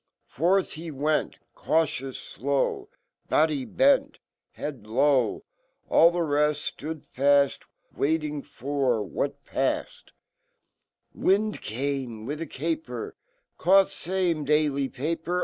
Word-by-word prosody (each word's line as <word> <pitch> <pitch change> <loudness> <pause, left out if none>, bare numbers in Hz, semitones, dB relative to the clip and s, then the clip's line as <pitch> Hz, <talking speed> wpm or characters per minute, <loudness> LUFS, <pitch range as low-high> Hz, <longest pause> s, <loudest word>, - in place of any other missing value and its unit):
^ - - -27
Frfh 185 +6 +2
hewent, 155 -1 -1 0.2
Cautious, 140 -4 -2 0.9
Body 150 -4 +2
bent, 275 +1 +3 0.4
Head 145 -6 -6
iov^, 125 +2 +2 0.5
Allfhereft 150 -3 +4
Stood 150 +1 -6
faff, 140 +1 +3 0.3
Waiting 150 0 0
for 140 -5 -1
What 95 - -4
paffed, - - -2 1.0
"Wind 210 +3 +1
came 125 -2 -3
Wifhacaper, 165 - -4 0.5
Caught 195 +1 +5
fame 175 -4 -1
Dally 145 -2 +1
paper. 165 +6 -2
150 Hz, 85 wpm, -26 LUFS, 135-165 Hz, 1.0 s, Caught